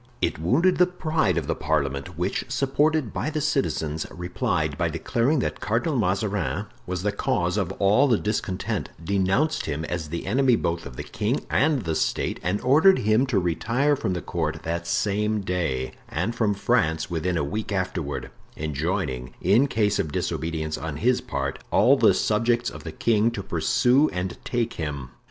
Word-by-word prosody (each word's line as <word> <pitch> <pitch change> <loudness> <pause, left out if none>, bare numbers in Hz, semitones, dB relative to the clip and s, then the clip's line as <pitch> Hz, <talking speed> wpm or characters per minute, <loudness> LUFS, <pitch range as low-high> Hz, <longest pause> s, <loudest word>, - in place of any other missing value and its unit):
It - - -1
wounded 155 - +3
the 180 - +6
pride 160 - 0
of 80 - -1
the - - 0
parliament, 70 -3 -2
which, - - -1
supported 140 -1 +1
by - - -2
the 155 - -2
citizens, 105 - -1
replied 90 0 -2
by - - 0
declaring 130 +7 0
that - - -3
Cardinal 120 +8 0
Mazarin 100 -1 0 0.2
was 90 0 -3
the 105 - +1
cause 100 -5 0
of 95 -4 -1
all 105 +9 +4
the 120 -5 +3
discontent; 105 -3 -2
denounced 100 - +1
him 80 +1 -2
as 80 -3 -4
the 85 +2 -4
enemy 125 +4 +3
both 85 -7 -2
of 65 - -11
the - - -5
king 110 +7 -2
and 145 -5 +2
the 80 -2 -1
state, - - -1
and 90 +4 0
ordered 155 +10 +5
him 110 +3 +2
to 125 -6 +1
retire 115 - +1
from 95 - -2
the 90 - -4
court 80 -2 -2
that 85 +1 -3
same 105 +4 0
day 85 -9 -2 0.2
and 95 +9 -1
from 110 -3 +1
France 80 -3 +1
within 85 +1 -1
a 75 - 0
week 105 +9 -3
afterward; 85 -9 -3 0.3
enjoining, 75 -4 -2
in 115 +10 +4
case 105 -5 +1
of 75 - -1
disobedience 80 0 -2
on 80 -2 -4
his 125 +8 +2
part, - - -3
all - - +5
the - - +4
subjects 115 +2 +1
of - - -10
the - - -6
king 115 -1 +2
to 105 -4 -5
pursue 125 - +3
and 90 0 -4
take 120 -1 -1
him. 70 -5 -5
100 Hz, 175 wpm, -25 LUFS, 80-120 Hz, 0.3 s, the